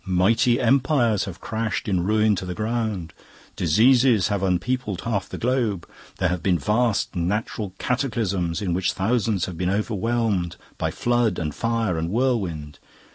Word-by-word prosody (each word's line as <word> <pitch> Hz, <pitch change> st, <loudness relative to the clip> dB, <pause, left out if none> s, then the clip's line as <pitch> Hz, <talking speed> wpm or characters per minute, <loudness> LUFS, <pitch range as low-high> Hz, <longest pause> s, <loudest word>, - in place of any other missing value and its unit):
Mighty 105 Hz, +7 st, +2 dB
empires 125 Hz, -4 st, +2 dB
have 90 Hz, -2 st, -8 dB
crashed 110 Hz, 0 st, -3 dB
in 90 Hz, -4 st, +1 dB
ruin 105 Hz, +2 st, +3 dB
to -, -, -4 dB
the 90 Hz, -1 st, -5 dB
ground, 110 Hz, -7 st, -2 dB, 0.4 s
diseases 115 Hz, -, +4 dB
have 100 Hz, -2 st, -1 dB
unpeopled 95 Hz, +2 st, -1 dB
half 105 Hz, -5 st, -2 dB
the -, -, -6 dB
globe, 115 Hz, -7 st, -1 dB, 0.3 s
there 90 Hz, -, +1 dB
have 90 Hz, -1 st, -2 dB
been 90 Hz, -3 st, +2 dB
vast 105 Hz, -, 0 dB
natural 95 Hz, +2 st, -2 dB
cataclysms 105 Hz, -, -1 dB
in 90 Hz, -3 st, -1 dB
which 90 Hz, +1 st, 0 dB
thousands 105 Hz, -1 st, 0 dB
have 90 Hz, -3 st, -7 dB
been 90 Hz, 0 st, 0 dB
overwhelmed 105 Hz, -3 st, 0 dB, 0.2 s
by -, -, 0 dB
flood 120 Hz, -2 st, +1 dB
and 75 Hz, -3 st, -3 dB
fire 115 Hz, -6 st, -1 dB
and 80 Hz, +1 st, -2 dB
whirlwind. 95 Hz, -, -1 dB
105 Hz, 150 wpm, -23 LUFS, 90-115 Hz, 0.4 s, diseases